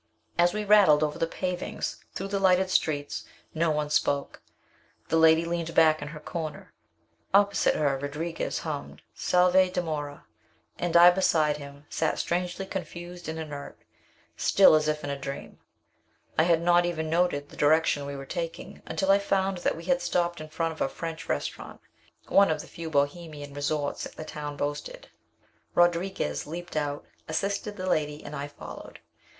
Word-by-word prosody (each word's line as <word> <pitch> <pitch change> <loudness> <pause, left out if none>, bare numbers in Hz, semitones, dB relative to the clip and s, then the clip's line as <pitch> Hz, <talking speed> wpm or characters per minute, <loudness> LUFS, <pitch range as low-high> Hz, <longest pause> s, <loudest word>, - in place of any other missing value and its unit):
As 175 0 +4
we 210 +1 -3
rattled 195 -8 +6
over 150 +1 -2
the 165 - +1
pavings, 180 +1 -4
through 195 +1 -4
the 200 0 -1
lighted 190 -1 +3
streets, 145 -4 0 0.3
no 165 +1 +1
one 150 -1 -1
spoke. 140 -1 0 0.7
The - - +1
lady 160 0 +5
leaned 170 -1 -3
back 155 -2 +5
in 145 - -5
her 150 +1 -8
corner. 155 0 -6 0.6
Opposite 200 0 +4
her 140 -3 +1
Rodriguez 150 +4 -3
hummed 150 -3 -5
"Salve! 180 +1 +3
dimora" 155 -5 -3 0.6
and 175 -1 +2
I 175 +1 +9
beside 155 -5 +2
him, 140 0 -11
sat 160 - -1
strangely 180 +2 -2
confused 175 -2 -7
and 160 - -4
inert, 150 -3 -7 0.6
still 195 - +6
as 155 0 +3
if 150 0 -1
in 145 - -3
a 140 - -4
dream. 140 0 -7 0.8
I 160 - +4
had 170 -1 +3
not 175 0 +5
even 160 -2 -2
noted 160 -3 +1
the - - -13
direction 150 -1 +3
we 140 - -5
were 135 0 -7
taking, 165 +1 -5
until 190 +5 +1
I 200 - +5
found 195 -2 0
that 175 - 0
we 165 - -8
had 265 0 +2
stopped 175 -2 0
in 155 - -8
front 165 +1 -1
of 160 - -9
a - - +1
French 165 -1 -6
restaurant, - - -4 0.5
one 200 -2 +5
of 160 - 0
the - - -12
few 165 -1 -7
Bohemian 145 0 -2
resorts 145 0 -2
the 155 - -8
town 150 -1 -6
boasted. 145 - -4 0.7
Rodriguez 175 - +1
leaped 175 +2 -7
out, 145 -1 -2 0.2
assisted 200 +5 -2
the 185 - -4
lady, 150 -3 0
and 145 - -6
I 140 0 -4
followed. 145 - -10
160 Hz, 165 wpm, -27 LUFS, 150-175 Hz, 0.8 s, I